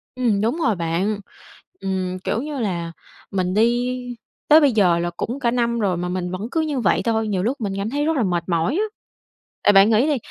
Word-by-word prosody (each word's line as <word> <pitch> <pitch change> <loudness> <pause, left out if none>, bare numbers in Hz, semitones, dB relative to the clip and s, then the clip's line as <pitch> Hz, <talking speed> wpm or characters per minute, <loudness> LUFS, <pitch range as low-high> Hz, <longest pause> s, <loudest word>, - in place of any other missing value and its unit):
Ừm, 230 -6 +1
đúng 230 +8 0
rồi 235 - +1
bạn. 175 +5 -1 0.6
Ừm, 185 -1 -2
kiểu 220 +5 -2
như 295 -1 -5
là, 170 -6 -2 0.4
mình 185 -1 -1
đi 240 +3 +2 0.5
tới 310 +1 +8
bây 285 -4 +4
giờ 185 -6 +3
là 175 0 -1
cũng 250 +9 -4
cả 235 - +2
năm 235 -1 0
rồi 195 -5 0
mà 175 +1 -3
mình 180 0 -3
vẫn 190 +5 -4
cứ 325 - 0
như 300 -4 -1
vậy 210 - +2
thôi, 220 -1 0
nhiều 190 -3 -1
lúc 250 +7 -1
mình 205 -3 -2
cảm 200 +3 -2
thấy 290 +2 -1
rất 320 +1 +1
là 260 - +2
mệt 175 -4 0
mỏi 170 - +1
á. 405 - +1 0.8
Tại - - +6
bạn 195 +2 +6
nghĩ 225 +6 +4
đi, 295 - +2
215 Hz, 225 wpm, -21 LUFS, 185-250 Hz, 0.8 s, tới